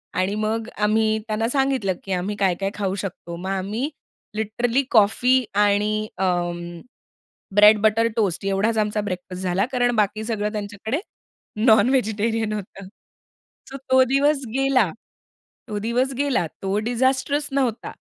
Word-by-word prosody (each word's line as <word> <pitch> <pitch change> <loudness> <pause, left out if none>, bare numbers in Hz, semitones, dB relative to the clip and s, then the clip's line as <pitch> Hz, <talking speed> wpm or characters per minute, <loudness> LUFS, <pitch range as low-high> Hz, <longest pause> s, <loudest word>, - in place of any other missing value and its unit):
आणि 185 +3 0
मग 220 +1 -2
आम्ही 215 +1 +2
त्यांना 220 +1 -1
सांगितलं, 265 -7 +1
की 195 - -7
आम्ही 185 +3 -2
काय-काय 195 0 +1
खाऊ 195 -2 -2
शकतो. 180 -3 -6
मग 185 +3 -6
आम्ही 205 +9 -2 0.5
लिटरली 230 +4 0
कॉफी 245 +4 +4
आणि 210 +1 +2
अं, 175 -2 -2 0.8
ब्रेड 210 +1 +7
बटर 220 +2 +3
टोस्ट 200 -5 0
एवढाच 210 +3 +1
आमचा 210 0 0
ब्रेकफास्ट 185 -2 -5
झाला 185 +1 +1
कारण 245 -1 +1
बाकी 215 +1 0
सगळं 210 -2 -2
त्यांच्याकडे 210 - -4 0.7
नॉनव्हेजिटेरियन 220 -2 +2
होतं. 195 -2 -7 0.8
सो 270 - -6
तो 260 0 +6
दिवस 275 +2 +2
गेला, 265 -7 +2 0.8
तो 210 -1 -3
दिवस 245 +5 0
गेला. 280 -11 +1 0.2
तो 195 +1 0
डिजास्ट्रेस 265 +4 +1
नव्हता. 260 -5 -1
215 Hz, 130 wpm, -22 LUFS, 195-245 Hz, 0.8 s, ब्रेड